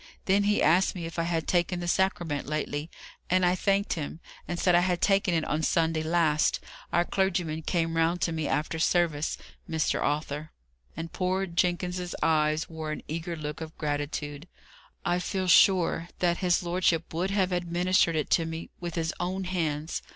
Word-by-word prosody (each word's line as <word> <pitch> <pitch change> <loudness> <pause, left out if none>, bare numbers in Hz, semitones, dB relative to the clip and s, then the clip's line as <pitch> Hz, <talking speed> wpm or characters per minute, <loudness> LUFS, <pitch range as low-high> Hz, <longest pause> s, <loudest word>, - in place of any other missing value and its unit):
Then 200 +1 +3
he 210 0 +2
asked 175 +6 +4
me 170 -2 -4
if 165 +1 -5
I 165 - +1
had 165 -3 -1
taken 175 0 +1
the 175 - -4
Sacrament 175 -6 0
lately; 150 +1 -3 0.4
and 185 0 +3
I 180 - +4
thanked 195 +2 +1
him, 155 0 -5 0.3
and 175 - -3
said 180 0 +3
I 175 - +6
had 180 0 +1
taken 195 -2 +2
it 160 - 0
on 155 - -1
Sunday 160 0 +1
last; 160 -2 +2 0.3
our 175 - +2
clergyman 175 -5 0
came 165 0 -1
round 165 +2 +2
to 165 - +1
me 160 -2 -2
after 155 +3 -1
service. 160 -3 +1 0.3
Mr. 160 -1 0
Arthur" 150 +1 -2 0.5
and 165 0 -6
poor 185 +1 0
Jenkins's 180 0 -1
eyes 155 0 +2
wore 160 -1 -5
an 155 - -5
eager 165 +2 -4
look 150 0 -6
of 160 0 -8
gratitude 145 +1 -3 0.6
"I 175 - +1
feel 190 +1 -2
sure 175 -2 +4
that 175 -1 +1
his 180 -1 +1
lordship 175 -2 0
would 175 +4 -1
have 195 -2 +1
administered 175 0 +2
it 155 - -1
to 165 - +3
me 165 0 -6
with 175 -2 -5
his 165 -1 -1
own 185 +2 -2
hands. 160 -4 -2
170 Hz, 180 wpm, -28 LUFS, 160-180 Hz, 0.6 s, I